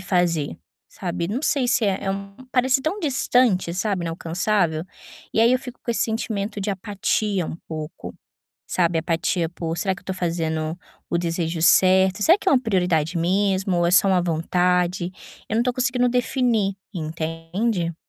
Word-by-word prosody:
fazer", 175 -6 0 0.3
sabe, 170 -2 -4
não 245 +7 -2
sei 275 -4 +1
se 240 - +2
é 195 -2 0
é 195 - 0
um 195 0 -6 0.2
parece 260 +1 +3
tão 370 +7 -2
distante, 250 - +2
sabe, 190 -2 -1
inalcançável? 165 0 0 0.5
E - - +2
aí 230 +2 +5
eu 255 - +3
fico 250 -1 -10
com - - -2
esse 230 - +1
sentimento 215 -2 -2
de 200 - -1
apatia, 200 -1 -1
um - - -5
pouco, 155 0 -7 0.5
sabe, 170 -2 +1
apatia 165 +1 0
por, 165 -1 -4
será 190 +3 0
que - - -13
eu - - -24
estou 190 - -4
fazendo 165 -2 -2 0.3
o 170 - +1
desejo 165 -1 -2
certo? 190 +3 +5
Será 340 - +6
que 390 - -1
é - - +4
uma 260 - +5
prioridade 180 -7 +1
mesmo 190 +1 +1
ou 175 - +2
é - - +2
só 185 +2 +5
uma 185 -2 +3
vontade? 180 +2 +1 0.4
Eu - - -1
não 230 - +3
estou 250 0 0
conseguindo 250 -1 +1
definir, 240 -5 +1 0.2
entende? 165 +3 -2
185 Hz, 170 wpm, -23 LUFS, 170-220 Hz, 0.5 s, Será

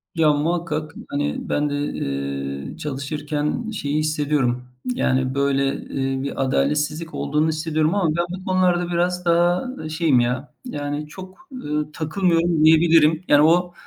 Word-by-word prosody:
Ya, 155 -2 +4
muhakkak, 155 0 -1 0.2
hani, 145 +1 -1
ben 145 0 +1
de, 145 - -2
eee, 70 - -4
çalışırken 150 - -3
şeyi 145 -8 -2
hissediyorum. 145 -5 0 0.3
Yani, 130 - 0
böyle, 140 0 +1
eee, 135 0 -3
bir 135 0 -2
adaletsizlik 150 +4 0
olduğunu 150 +2 0
hissediyorum 155 +1 0
ama 190 -5 +2
ben 170 - +1
bu 185 +1 -7
konularda 180 -2 +2
biraz 180 +1 0
daha, 175 +1 +3
ııı, 255 -11 -6
şeyim 155 -4 +2
ya, 125 +4 -1
yani 145 - -4
çok, 185 +4 -11
eee, 255 - -7 0.2
takılmıyorum 165 0 +1
diyebilirim. 160 0 +5
Yani 145 0 +6
o 175 +2 +3
155 Hz, 140 wpm, -22 LUFS, 140-170 Hz, 0.3 s, Yani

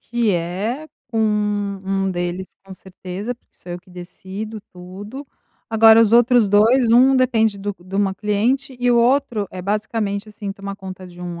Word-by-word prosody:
que 235 -2 0
é, 195 - -2 0.2
com 225 - -2
um 200 -2 0
deles 175 +1 -3 0.2
com 195 -1 -10
certeza, 190 +5 -7
porque 235 - -39
sou 175 - -10
eu 175 - -5
que 180 - -22
decido 190 +4 -8
tudo, 200 +10 -9 0.4
agora 225 0 +7
os 225 -1 +3
outros 240 -2 +5
2, 225 +4 +4
um 260 +3 +6
depende 225 -5 +2
do 205 0 -4
de 185 - -10
uma 195 -1 +1
cliente 230 +7 -1
e 245 0 +2
o 240 - +4
outro 240 -4 +2
é 185 -1 -7
basicamente, 210 0 -2
assim, 205 -2 -6
tomar 200 0 -7
conta 185 -1 -9
de 175 0 -14
um 175 -1 -6
205 Hz, 175 wpm, -20 LUFS, 190-230 Hz, 0.4 s, agora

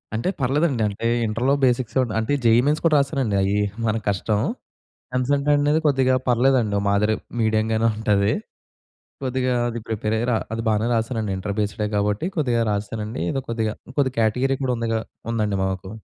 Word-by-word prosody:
అంటే 115 +11 -1
పర్లేదండి. 135 -1 +1
అంటే 110 +3 -3 0.2
ఇంటర్‌లో 120 +5 +1
బేసిక్స్ 125 0 0 0.2
అంటే 110 +6 -1
జెయి 115 +1 +6
మెయిన్స్ 150 +2 +1
కూడా 155 -2 +4
రాసానండి 135 -7 0
అయి 100 +2 +1 0.3
మన 110 0 +1
కష్టం. 105 +1 0 0.8
ఎంసెట్ 140 +3 +1
అనేది 145 +2 +2
కొద్దిగా 130 -2 +3
పర్లేదండి 125 -3 +3
ఒక 100 - -1
మాదిరి 105 +2 +2 0.2
మీడియంగానే 110 0 +1
ఉంటది. 105 -1 +2 0.9
కొద్దిగా 130 -1 0
అది 120 0 -4
ప్రిపేర్ 110 -1 -2
అయ్యి‌ 120 - -1
రా 115 - +2 0.2
అది 115 0 -2
బానే 110 +1 +1
రాసానండి 110 -2 -1
ఇంటర్ 100 +1 -4
బేస్‌‌డే 105 0 -1
కాబట్టి 105 - 0
కొద్దిగా 125 -7 +1
రాసానండి 105 -2 -3
ఏదో 135 - -1
కొద్దిగా, 110 -2 -1 0.2
కొద్దిగా 135 -3 +1
కేటగిరీ 125 +5 +2
గూడా 130 - +1
ఉందిగా 115 -1 -1 0.3
ఉందండి 105 -3 0
మాకు. 95 0 -3
115 Hz, 155 wpm, -23 LUFS, 105-130 Hz, 0.9 s, జెయి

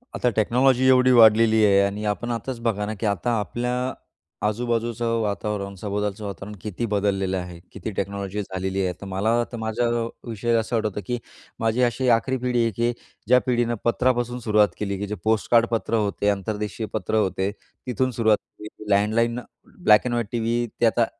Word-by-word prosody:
आता 125 - +1
टेक्नॉलॉजी 125 +4 +3
एवढी 130 0 +5
वाढलेली 110 -1 +6
आहे 100 -1 +5
आणि 100 +2 -1
आपण 110 +4 -2
आताच 120 +1 -4
बघा 105 -3 0
ना, 110 - -3
की 115 - -2
आता 105 +4 0
आपल्या 120 +4 -2 0.7
आजूबाजूचं 115 +1 -1
वातावरण, 100 -1 -3
सभोवतालचं 105 0 -3
वातावरण 100 +1 -7
किती 110 +3 -3
बदललेलं 95 -2 0
आहे, 90 -1 -6
किती 100 +2 -6
टेक्नॉलॉजी 100 +1 -3
झालेली 95 0 -3
आहे. 90 - -1
तर 100 - -7
मला 110 +5 +1
तर 120 - -5
माझ्या 110 +2 -1 0.4
विषयी 115 +2 -2
असं 115 +2 0
आठवतं, 105 -2 -2
की 120 0 -1 0.4
माझी 115 +2 +1
अशी 125 +2 +1
आखरी 130 +2 -2
पिढी 125 -1 0
आहे, 115 - +1
की 120 +1 +2 0.4
ज्या 125 +2 +6
पिढीनं 120 -1 +1
पत्रापासून 120 0 +1
सुरुवात 105 -3 +3
केली, 100 -2 -2
की 105 - -3
जे 105 - -3
पोस्टकार्ड 110 +2 +3
पत्र 115 0 0
होते, 105 -1 0
आंतरदेशीय 105 +2 -2
पत्र 110 0 -2
होते. 95 -2 +1 0.4
तिथून 125 +2 0
सुरुवात 110 -2 +3 0.2
केली 105 0 -8
landline, 115 +4 +2 0.4
black 105 +3 +6
and 125 - -1
white 120 -2 -1
TV, 120 0 0
ते - - +5
आता 115 +1 +3
110 Hz, 175 wpm, -24 LUFS, 100-120 Hz, 0.7 s, वाढलेली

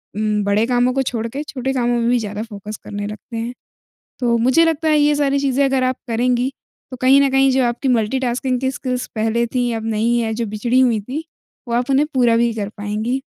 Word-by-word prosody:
उम, 210 0 0
बड़े 205 +2 +2
कामों 245 0 +2
को 270 - +1
छोड़ 235 -3 -2
के, 275 +6 -5
छोटे 265 -2 -3
कामों 240 -1 +1
में 235 0 +1
भी 245 - +3
ज़्यादा 210 -1 -4
फ़ोकस 210 -1 -8
करने 205 0 -5
लगते 215 +2 -8
हैं। 235 +2 -3 0.7
तो 235 -2 +2
मुझे 260 +8 +4
लगता 320 -1 0
है 305 -1 +4
ये 295 0 +4
सारी 280 -1 +1
चीज़ें 275 0 +1
अगर 270 -1 +1
आप 255 0 0
करेंगी, 245 +3 +1 0.4
तो 255 - -6
कहीं 265 +2 +6
न 275 - +2
कहीं 270 0 +4
जो 260 0 +2
आपकी 240 +3 -1
मल्टी-टास्किंग 250 +2 0
की 265 - 0
स्किल्स 255 -1 -3
पहले 225 +2 +1
थी, 245 0 -1
अब 225 -1 -3
नहीं 225 +2 +1
है, 225 -1 -1
जो 230 0 -2
बिछड़ी 235 +5 +1
हुई 240 -4 +3
थी, 270 +10 -5 0.4
वो 235 - -1
आप 245 +3 0
उन्हें 275 +2 +3
पूरा 240 -3 +4
भी 235 0 +2
कर 205 -3 -3
पाएँगी। 215 +5 -2
245 Hz, 225 wpm, -19 LUFS, 225-265 Hz, 0.7 s, कहीं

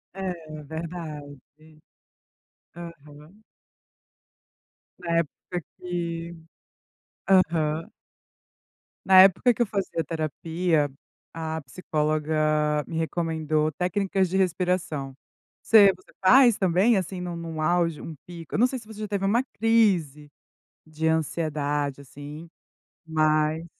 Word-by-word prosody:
É. 190 -1 -3 0.3
Verdade. 155 -2 -7 1.4
Aham. 165 +2 -12 1.6
Na 170 -1 -1
época 170 +2 -3 0.2
que, 170 -1 -4 0.9
aham. 165 -4 +2 1.1
Na 190 -1 +8
época 195 +6 +5
que 240 - -4
eu - - +4
fazia 195 -5 -2
terapia, 160 0 -1 0.4
a 160 -1 -4
psicóloga 155 0 0
me 165 - -5
recomendou 160 -2 -1
técnicas 190 +1 0
de 190 - -1
respiração. 175 -6 -1 0.5
Você 205 -3 +7
você 185 - -22
faz, 240 +3 +6
também, 190 +4 +3
assim, 185 0 -3
nu 175 -1 -5
num 165 -2 -5
auge, 170 -1 +1
um 160 - -8
pico. 170 -2 -8
Eu - - 0
não 245 - +5
sei 255 0 -5
se 215 - -16
você 215 -1 -11
já 210 - -3
teve 200 -1 -2
uma 235 +6 +2
crise 195 - +1 0.6
de 160 +1 -3
ansiedade, 150 -3 -1
assim, 145 +4 -10 0.6
mas 155 0 +1
165 Hz, 110 wpm, -25 LUFS, 155-185 Hz, 1.6 s, Na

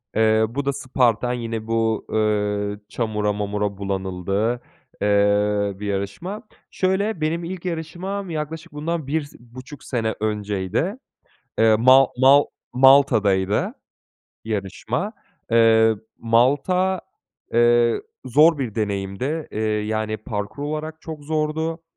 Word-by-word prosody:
Eee, 110 0 +4
bu 140 +4 -3
da 140 - +1
Spartan 125 -3 +1
yine 115 -2 -4
bu, 115 -1 0
eee, 105 -1 0
çamura 105 -3 -1
mamura 105 -1 -2
bulanıldığı, 100 +4 -2 0.4
eee, 100 0 +2
bir 105 - -5
yarışma. 100 - -4 0.3
Şöyle, 190 0 0
benim 165 +3 -1
ilk 180 +1 -6
yarışmam 180 +4 -4
yaklaşık 160 +1 -5
bundan 155 0 -3
bir 155 +3 0
si 145 - -14
buçuk 130 +4 -12
sene 110 -4 -2
önceydi. 105 - -2 0.6
Eee, 110 -1 +6
Ma 130 +2 +7
Mal 140 +2 +7 0.3
Malta'daydı 110 -7 +4 0.7
yarışma. 110 - -3 0.4
Eee, 115 -1 +5 0.2
Malta, 145 +11 +2 0.5
eee, 120 0 +3 0.2
zor 150 +5 +5
bir 120 -6 -3
deneyimdi. 105 +8 -2
Eee, 110 - -4
yani, 110 0 -1
parkur 105 +5 -5
olarak 155 +2 -4
çok 155 -3 -8
zordu. 160 +2 -2
115 Hz, 110 wpm, -22 LUFS, 105-150 Hz, 0.7 s, Ma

